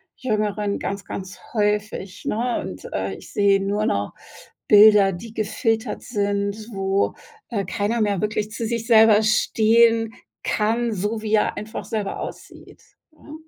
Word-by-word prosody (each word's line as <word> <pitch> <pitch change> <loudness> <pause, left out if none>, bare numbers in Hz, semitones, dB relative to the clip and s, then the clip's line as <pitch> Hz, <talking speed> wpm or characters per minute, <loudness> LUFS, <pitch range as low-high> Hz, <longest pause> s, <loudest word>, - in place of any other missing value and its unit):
Jüngeren 210 -4 -1
ganz, 195 0 -4
ganz 190 0 -7
häufig, 210 -3 -1
ne? 235 +3 -1
Und, 90 - -8
äh, 95 0 -2
ich - - -13
sehe 200 -1 +3
nur 205 +2 -1
noch 100 - -1 0.6
Bilder, 210 -1 +7
die 215 +5 -9
gefiltert 225 +2 -1
sind, 200 0 -1 0.2
wo, 195 -1 0 0.4
äh, 205 -5 -2
keiner 205 +5 -1
mehr 205 -4 0
wirklich 210 0 -1
zu 230 +1 -4
sich 230 0 -3
selber 220 -2 +6
stehen 225 +1 +3 0.3
kann, 225 +2 0
so 210 +3 -2
wie 215 -1 -3
er 215 - +2
einfach 215 +1 -6
selber 210 -3 -3
aussieht, - - -10 0.3
ne? 305 -1 -14
210 Hz, 140 wpm, -22 LUFS, 200-225 Hz, 0.6 s, Bilder